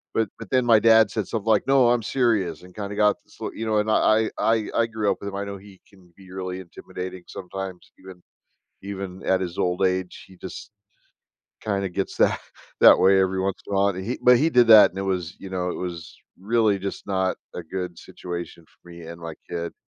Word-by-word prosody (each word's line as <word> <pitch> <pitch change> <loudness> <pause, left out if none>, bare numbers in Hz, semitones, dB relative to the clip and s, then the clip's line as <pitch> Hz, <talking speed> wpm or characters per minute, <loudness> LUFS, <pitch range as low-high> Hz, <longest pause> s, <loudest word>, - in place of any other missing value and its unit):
but 110 -3 +1
but 115 - -9
then 130 -2 +2
my 115 -2 +6
dad 110 -2 +5
said 105 -2 -3
something 110 -2 -4
like, 110 +2 +2
"No, 135 -3 +5
I'm 120 -1 +2
serious," 110 -7 0
and 90 0 -15
kinda 100 -1 -6
got 105 0 +3
sl - - -7
you 115 - -5
know, 110 -1 +1
and 105 +1 0
I 110 0 +3
I 115 -1 +1
I 115 0 +2
grew 110 -2 -1
up - - -2
with 100 - -5
him. 100 - -8
I 100 - -3
know 100 0 -6
he 95 -1 -16
can 90 -3 -22
be 95 -1 -15
really 95 0 -5
intimidating 90 0 -8
sometimes 95 -1 -8
even 95 -2 -13 0.6
even 95 -1 -7
at 95 - +2
his 90 -1 -5
old 90 +1 +1
age, 90 -1 -4
he 95 - -16
just 100 - -9 0.9
kinda 100 -2 -1
gets 95 +2 -4
that - - +3 0.4
that - - +8
way 95 0 +5
every 95 0 +1
once 95 0 -1
in - - -7
while, 100 +1 +3
but 95 - -5
he 120 +6 -4
but 125 0 +7
he 155 +7 +2
did 125 -5 +5
that, 110 -2 +8
and 95 - -9
it - - -2
was 90 -3 -3
you 95 - -9
know, 90 -1 -2
it - - -4
was 85 -3 -6 0.3
really 105 -1 +1
just 100 0 -6
not 95 -1 0 0.2
a 90 - -5
good 90 0 -5
situation 85 -1 -8
for 90 - -23
me 85 0 -11
and 85 +1 -10
my 85 -1 -7
kid. 85 -1 -4
95 Hz, 225 wpm, -24 LUFS, 90-110 Hz, 0.9 s, that